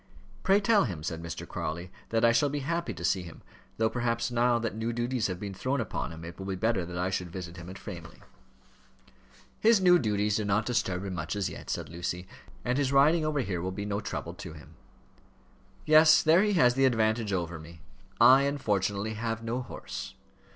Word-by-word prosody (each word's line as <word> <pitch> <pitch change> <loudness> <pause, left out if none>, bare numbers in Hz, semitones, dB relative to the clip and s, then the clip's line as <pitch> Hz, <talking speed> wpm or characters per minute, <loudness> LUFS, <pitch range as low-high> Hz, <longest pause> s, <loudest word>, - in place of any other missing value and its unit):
"Pray 195 +2 +4
tell 210 0 +3
him," 85 -9 -5
said 80 0 -4
Mr. 85 -1 -6
Crawley, 85 +2 -5 0.2
"that 115 0 +2
I 115 - +6
shall 130 +5 +3
be 145 +1 -3
happy 170 +4 -2
to 85 - -5
see 95 +2 +1
him; 85 -2 -11 0.3
though, 110 - +2
perhaps, 120 0 -1
now 120 0 +3
that 115 -2 -2
new 110 +1 -2
duties 120 0 -1
have 90 -2 -4
been 100 -1 -5
thrown 130 +8 -1
upon 115 - -3
him, 80 0 -9
it 85 +2 -9
will 95 - -6
be 95 - -2
better 100 -2 0
that 90 0 -6
I 90 +2 -1
should 90 -2 -2
visit 90 -1 -7
him 85 +1 -9
at 95 - -8
Framley." 85 -5 -9 1.4
"His 225 -1 +5
new 180 -2 +6
duties 105 -3 0
do 110 - -1
not 100 +2 +1
disturb 95 -6 -1
him 95 - -4
much 85 +1 -4
as 100 -2 -1
yet," - - -10
said - - -3
Lucy. 85 +2 -5 0.4
"And 125 +2 +1
his 135 -2 +1
riding 150 +4 +4
over 155 -2 0
here 90 -8 -3
will 95 +2 -3
be 100 +2 -5
no 100 0 -2
trouble - - -5
to - - -9
him." 75 -2 -14 1.1
"Yes; 155 0 +7
there 165 +3 +5
he 210 0 +2
has 125 -9 +5
the 135 +1 +3
advantage 110 -3 +1
over 85 -3 -2
me. 80 +1 -13 0.4
I 135 +1 +8
unfortunately 105 -6 -1
have 115 +1 -3
no 120 +3 -2
horse." - - -7
110 Hz, 210 wpm, -29 LUFS, 90-130 Hz, 1.4 s, I